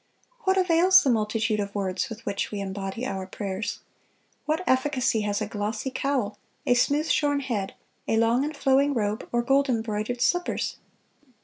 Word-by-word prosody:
What 380 0 +3
avails 365 +1 +5
the 270 - +3
multitude 220 0 0
of 200 0 -4
words 190 0 -1
with 225 -1 -9
which 200 -1 -2
we 205 - -4
embody 195 +4 -4
our 190 -6 -4
prayers? 200 +2 -4 0.7
What 315 +4 0
efficacy 260 -4 +2
has 205 0 -1
a - - -1
glossy 215 +4 -3
cowl, 255 -6 -1 0.3
a - - +4
smooth 285 +5 +2
shorn 290 -1 +2
head, 225 -8 -3 0.3
a 225 - +2
long 230 +3 +3
and 300 0 -4
flowing 275 +1 +3
robe, 210 -1 -2
or 240 0 +1
gold 275 +2 +3
embroidered 225 0 -1
slippers?... 355 +9 0
230 Hz, 165 wpm, -26 LUFS, 205-280 Hz, 0.7 s, avails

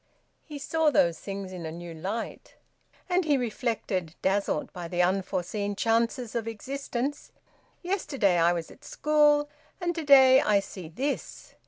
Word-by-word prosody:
He 300 -2 -8
saw 315 +2 +1
those 170 - +2
things 195 -1 -6
in 180 -2 -7
a 160 - -5
new 170 +1 -8
light. 195 +8 -5 0.5
And 365 0 +2
he 295 -3 +2
reflected, 220 - -2
dazzled 195 -5 0
by 175 -1 -6
the 175 +1 +1
unforeseen 195 +2 -1
chances 230 +2 0
of 230 -1 -2
existence: 270 +4 -4 0.5
"Yesterday 275 - +1
I 170 +1 +4
was 170 -2 -3
at - - -17
school 295 0 +3 0.3
and 350 -1 -1
to 330 -1 -4
day 265 -2 +7
I 205 -1 +3
see 190 -3 -8
this!" 275 - -4
225 Hz, 150 wpm, -27 LUFS, 185-280 Hz, 0.5 s, day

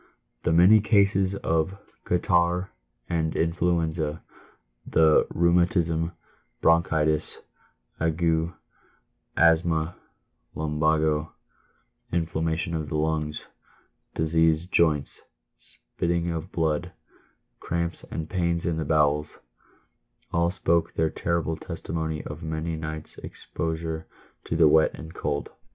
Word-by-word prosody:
The - - 0
many 90 +6 +7
cases 100 -2 +3
of 95 +1 -1 0.3
"catarrh"" 90 0 +1 0.4
and 80 -2 -1
"influenza," 80 -2 0 0.6
the 80 -1 +4
"rheumatism," 85 -1 +2 0.5
"bronchitis," 80 -2 +2 0.6
"ague," 80 +1 +1 0.9
"asthma," 80 0 +3 0.6
"lumbago," 75 0 +1 0.8
"in 85 -1 +1
flammation 80 +1 -2
of 80 -2 -3
the 75 - -1
lungs," 75 -1 -1 0.7
"diseased 80 +2 +2
joints," 75 -4 +2 0.4
"spitting 85 0 -3
of 85 +2 -5
blood," 80 +1 -1 0.3
" - - -42
cramps 85 0 -3
and 80 -1 -4
pains 85 -1 -1
in 85 -2 0
the 80 - -2
bowels," 75 0 +1 1.0
all 85 0 +2
spoke 85 -2 0
their 80 -1 +1
terrible 85 -1 -1
testimony 80 -1 -4
of - - -7
many 80 +1 -3
nights' 80 0 -5
exposure 80 -1 -4 0.4
to - - -2
the 80 - +6
wet 80 +1 +4
and 80 0 -10
cold. 70 - -3
80 Hz, 105 wpm, -26 LUFS, 80-85 Hz, 1.0 s, many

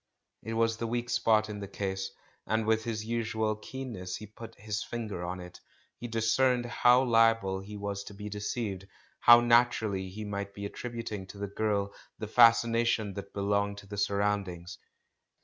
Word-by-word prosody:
It 115 - -5
was 115 0 +2
the 115 - -3
weak 120 +1 -2
spot 110 -1 +3
in 105 -1 -6
the 100 - -6
case, 95 -1 -3 0.4
and 110 +1 +1
with 110 0 +1
his 110 -2 -3
usual 110 -1 -1
keen 130 +4 -7
ness 90 -4 -5
he 105 - -7
had 105 - -21
put 115 - -10
his 105 0 -4
finger 110 -7 -5
on 90 +1 -4
it 90 0 -10 0.2
— - - -37
he 120 - -5
discerned 120 +2 +2
how 125 +1 +4
liable 115 -5 +3
he 105 +2 -8
was 100 -1 -4
to 100 - -10
be 105 +1 -7
deceived, 105 -2 -4 0.3
how 120 0 +8
naturally 115 -5 +2
he 105 +3 -7
might 100 -1 -5
be 100 - -5
attributing 115 -3 -5
to 100 - -11
the 100 - -3
girl 100 0 -1 0.2
the 110 - -5
fascination 115 -2 +4
that 100 0 -7
belonged 100 0 0
to 100 - -10
the 100 +1 -8
surroundings. 100 -3 -1
105 Hz, 185 wpm, -30 LUFS, 100-115 Hz, 0.4 s, how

